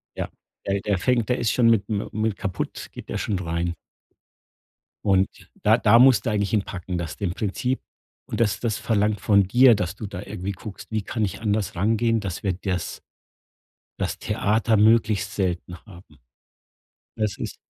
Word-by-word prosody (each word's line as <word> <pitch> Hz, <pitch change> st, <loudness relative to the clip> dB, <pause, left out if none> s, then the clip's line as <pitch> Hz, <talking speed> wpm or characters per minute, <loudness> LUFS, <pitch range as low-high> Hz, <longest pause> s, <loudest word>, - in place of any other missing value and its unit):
Ja -, -, -3 dB, 0.4 s
ja, 100 Hz, 0 st, +1 dB
der 100 Hz, -2 st, +1 dB
fängt 120 Hz, +2 st, +1 dB
der 125 Hz, -, +1 dB
ist 120 Hz, -1 st, +1 dB
schon 115 Hz, -2 st, +4 dB
mit 110 Hz, -4 st, +3 dB
mi 105 Hz, -1 st, -1 dB
mi -, -, -10 dB
mit 110 Hz, -2 st, +1 dB
kaputt 95 Hz, -4 st, -4 dB
geht -, -, -10 dB
der -, -, -2 dB
schon 100 Hz, -4 st, -1 dB
rein. 85 Hz, 0 st, -2 dB, 1.3 s
Und 95 Hz, -1 st, +4 dB, 0.4 s
da 110 Hz, +3 st, +5 dB
da 115 Hz, 0 st, +5 dB
musst 130 Hz, 0 st, +6 dB
du -, -, +1 dB
eigentlich 100 Hz, 0 st, -1 dB
ihn 105 Hz, -2 st, +3 dB
packen, 90 Hz, -1 st, -5 dB
dass 85 Hz, -2 st, -4 dB
dem 95 Hz, -3 st, -2 dB
Prinzip 125 Hz, +6 st, -1 dB, 0.5 s
und -, -, -5 dB
das 110 Hz, -4 st, +2 dB
das 115 Hz, -3 st, -1 dB
verlangt 105 Hz, -2 st, +1 dB
von 100 Hz, -1 st, +4 dB
dir, 120 Hz, +2 st, +6 dB
dass 90 Hz, -1 st, -2 dB
du 110 Hz, -, -7 dB
da 90 Hz, 0 st, -6 dB
irgendwie 100 Hz, -1 st, -5 dB
guckst, 105 Hz, +2 st, -10 dB
wie 110 Hz, -1 st, 0 dB
kann 110 Hz, +1 st, -1 dB
ich 95 Hz, -, -5 dB
anders 105 Hz, -3 st, -1 dB
rangehen, 115 Hz, +4 st, +2 dB
dass 95 Hz, -2 st, -5 dB
wir 95 Hz, -2 st, +1 dB
das 90 Hz, -1 st, -3 dB, 1.0 s
das -, -, -2 dB
Theater 110 Hz, +1 st, +1 dB
möglichst 110 Hz, -1 st, +3 dB
selten 90 Hz, -2 st, -2 dB
haben. 90 Hz, -6 st, -15 dB, 1.0 s
Das 105 Hz, -3 st, -1 dB
ist -, -, -5 dB
105 Hz, 180 wpm, -24 LUFS, 95-110 Hz, 1.3 s, musst